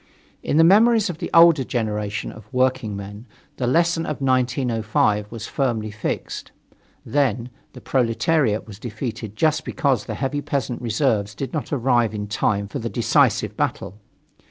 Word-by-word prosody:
In - - 0
the 165 - +7
memories 215 +3 +5
of 165 - -11
the - - -4
older 165 -4 +6
generation 105 -3 -3
of 110 +1 -14
workingmen, 115 -5 -2 0.3
the 125 - -1
lesson 170 +4 +2
of 150 - -3
1905 120 -5 +1
was 115 -1 -6
firmly 115 -7 -1
fixed; 105 0 -4 0.5
then, 125 -4 0 0.2
the - - -11
proletariat 125 -1 +1
was 105 -2 -11
defeated 110 -2 -6
just 155 +6 +1
because 130 -7 0
the - - -5
heavy 145 +1 -2
peasant 140 -4 -3
reserves 110 -3 0
did 135 - -5
not 155 - -4
arrive 120 -5 +1
in 105 -1 -3
time 100 -1 0
for 135 - -5
the 115 -1 -3
decisive 120 -1 +2
battle. 100 +4 -3
120 Hz, 150 wpm, -22 LUFS, 110-140 Hz, 0.5 s, the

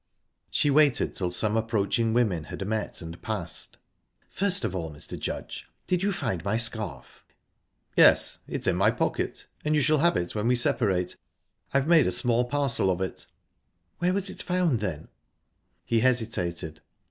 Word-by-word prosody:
She 145 - +2
waited 145 -2 +3
till 90 -2 -2
some 105 +4 0
approaching 110 0 +1
women 105 -9 +1
had 100 - -6
met 110 -4 -3
and 80 +1 -9
passed. 95 -7 -5 0.5
"First 200 0 +1
of - - -2
all, 85 -4 -3
Mr. 75 - -8
Judge - - -5 0.2
did 180 -1 0
you 200 +1 +1
find 95 - -2
my 100 +3 0
scarf?" 110 -4 -3 0.7
"Yes; - - +5
it's - - -4
in - - +3
my - - +4
pocket, - - -2 0.2
and 155 0 +1
you 150 - +3
shall 155 +1 +3
have 170 +3 +3
it 85 - -2
when 105 +1 -1
we 125 - +4
separate. 100 -6 +1 0.6
I've 140 0 +2
made 165 -5 +6
a - - +1
small 120 0 +2
parcel 135 -6 0
of 90 -1 0
it." 95 -1 -4 0.7
"Where 175 +1 +2
was 200 -1 -1
it - - -6
found, 180 - +1
then?" 85 -7 -4 0.8
He 115 - +2
hesitated. 90 -10 -1
115 Hz, 165 wpm, -27 LUFS, 95-145 Hz, 0.8 s, made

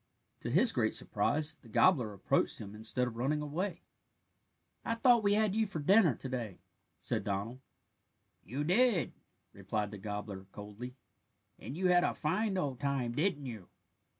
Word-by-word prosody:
To - - -5
his - - +4
great - - 0
surprise 155 +1 0
the 115 - -16
gobbler 125 - +4
approached 100 - 0
him 100 -1 -8
instead 110 +4 0
of 115 -2 -7
running 140 +5 0
away. 160 +7 -3 1.0
"I 230 - -1
thought 240 0 +5
we 205 -1 +3
had 215 -2 +2
you 220 0 +1
for 195 - -5
dinner 175 - +5
to 135 - -7
day," 120 -7 -4 0.4
said - - -2
Donald. 105 +5 -3 0.8
"You 130 +9 -3
did," 195 +3 +3 0.4
replied 105 -1 -3
the 105 - -8
gobbler 105 -1 -6
coldly, 105 +5 -8 0.6
"and 140 - -7
you 185 0 +2
had 175 0 +5
a - - 0
fine 195 +6 0
old 140 -8 -2
time, 140 -4 -1
didn't 145 +2 0
you?" 110 -7 -7
140 Hz, 160 wpm, -33 LUFS, 110-185 Hz, 1.0 s, thought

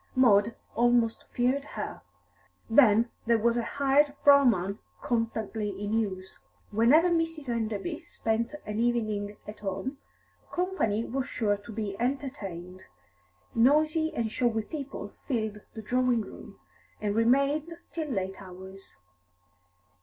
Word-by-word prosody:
Maud 225 -3 +4 0.2
almost 240 0 +2
feared 255 +3 +1
her. 215 -7 -6 0.7
Then 230 -2 +5 0.2
there 235 -1 +5
was 230 +1 +2
a 240 - +1
hired 280 +4 +2
brougham 230 -9 +5 0.2
constantly 225 -2 -1
in 205 +1 -3
use. 190 -4 -2 0.3
Whenever 270 +12 +5
Mrs. 325 -4 -1
Enderby 220 -4 -2
spent 230 +5 -2
an 210 +1 -3
evening 215 -4 0
at 210 0 -8
home, 210 +8 -4 0.5
company 350 - 0
was 270 +2 -2
sure 205 -3 0
to 205 +3 -11
be 210 -2 -3
entertained; 205 -9 -4 0.7
noisy 310 +6 +3
and 225 -2 -1
showy 230 -2 +1
people 280 +1 -6
filled 220 -5 -2
the 220 - -7
drawing 250 +1 +2
room, - - -11 0.4
and 205 -1 -1
remained 275 +8 +2 0.2
till 320 -2 -3
late 190 -6 -3
hours. 190 - -11
230 Hz, 120 wpm, -28 LUFS, 210-270 Hz, 0.7 s, Then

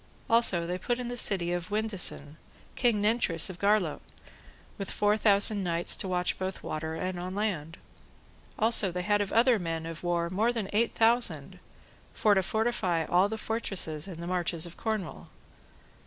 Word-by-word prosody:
Also 225 -7 +4
they 180 +2 -3
put 240 +4 -1
in 245 -1 -5
the 245 - -4
city 185 -7 +2
of 175 0 -4
Windesan, 195 -8 -2 0.4
King 230 -5 +1
Nentres 205 -6 +2
of 180 - -13
Garlot, 200 -6 +1 0.8
with 195 - -5
four 205 0 +1
thousand 205 -1 +3
knights 170 -1 +2
to - - -4
watch 180 -1 -1
both 190 0 -5
on - - -7
water 160 +1 -4
and 185 +2 -4
on 185 +2 -5
land. 175 -6 -3 0.8
Also 220 -3 +4
they 180 +1 -4
had 205 +1 +1
of 200 - -3
other 235 0 +4
men 165 -2 -4
of 165 0 -7
war 170 -1 0
more 215 +6 +1
than 225 -5 -4
eight 225 +2 +1
thousand, 235 +2 +1 0.6
for 210 - +3
to 190 - +3
fortify 190 -5 -1
all 180 +5 +2
the 220 - -4
fortresses 195 -8 -2
in 175 -4 -8
the 170 - -6
marches 175 -2 -1
of 170 -1 -10
Cornwall. 215 -7 -4
190 Hz, 175 wpm, -28 LUFS, 170-220 Hz, 0.8 s, Also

